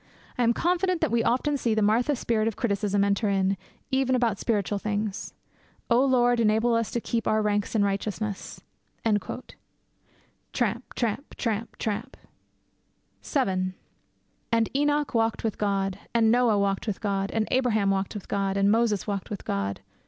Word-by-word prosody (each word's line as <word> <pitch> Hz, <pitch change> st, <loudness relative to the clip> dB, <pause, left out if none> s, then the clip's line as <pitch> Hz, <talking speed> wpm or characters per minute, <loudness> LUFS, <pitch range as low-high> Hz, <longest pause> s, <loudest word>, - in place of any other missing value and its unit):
I -, -, -1 dB
am 235 Hz, -1 st, +4 dB
confident 360 Hz, +1 st, +1 dB
that 315 Hz, -, +1 dB
we 235 Hz, 0 st, +3 dB
often 285 Hz, +4 st, +1 dB
see 230 Hz, -4 st, 0 dB
the 215 Hz, -, +2 dB
Martha 235 Hz, +7 st, +3 dB
spirit 225 Hz, -3 st, 0 dB
of 225 Hz, -, -1 dB
criticism 205 Hz, -3 st, 0 dB
enter 200 Hz, +1 st, +1 dB
in, 195 Hz, 0 st, +2 dB, 0.4 s
even 265 Hz, -1 st, +2 dB
about 235 Hz, -5 st, +1 dB
spiritual 205 Hz, -3 st, 0 dB
things. 210 Hz, -1 st, -3 dB, 0.6 s
O 240 Hz, +3 st, +5 dB
Lord, 245 Hz, -3 st, +3 dB
enable 225 Hz, +2 st, +3 dB
us 230 Hz, -1 st, +1 dB
to 235 Hz, -, -1 dB
keep 230 Hz, 0 st, -2 dB
our 215 Hz, 0 st, +3 dB
ranks 205 Hz, +1 st, 0 dB
in 210 Hz, -, +4 dB
righteousness!' 200 Hz, +1 st, -3 dB, 0.4 s
Tramp! 210 Hz, -3 st, 0 dB, 1.6 s
tramp! 235 Hz, +4 st, -2 dB
tramp! 225 Hz, -1 st, -2 dB
tramp! 220 Hz, +4 st, -3 dB, 1.0 s
VII 185 Hz, -, 0 dB, 0.8 s
'And 230 Hz, +2 st, +1 dB
Enoch 290 Hz, 0 st, +1 dB
walked 225 Hz, -1 st, +1 dB
with 220 Hz, -3 st, -2 dB
God.' 195 Hz, -2 st, 0 dB, 0.2 s
'And 225 Hz, -1 st, +5 dB
Noah 240 Hz, -3 st, +4 dB
walked 200 Hz, +1 st, 0 dB
with 210 Hz, -, -2 dB
God.' 195 Hz, -1 st, -1 dB
'And 220 Hz, -1 st, -1 dB
Abraham 220 Hz, -6 st, +2 dB
walked 195 Hz, +2 st, -1 dB
with 205 Hz, -, -7 dB
God.' 195 Hz, -1 st, -1 dB
'And 200 Hz, +1 st, +4 dB
Moses 225 Hz, -3 st, +2 dB
walked 200 Hz, -3 st, -3 dB
with 205 Hz, -, -6 dB
God.' 100 Hz, 0 st, -2 dB
220 Hz, 160 wpm, -26 LUFS, 200-240 Hz, 1.6 s, O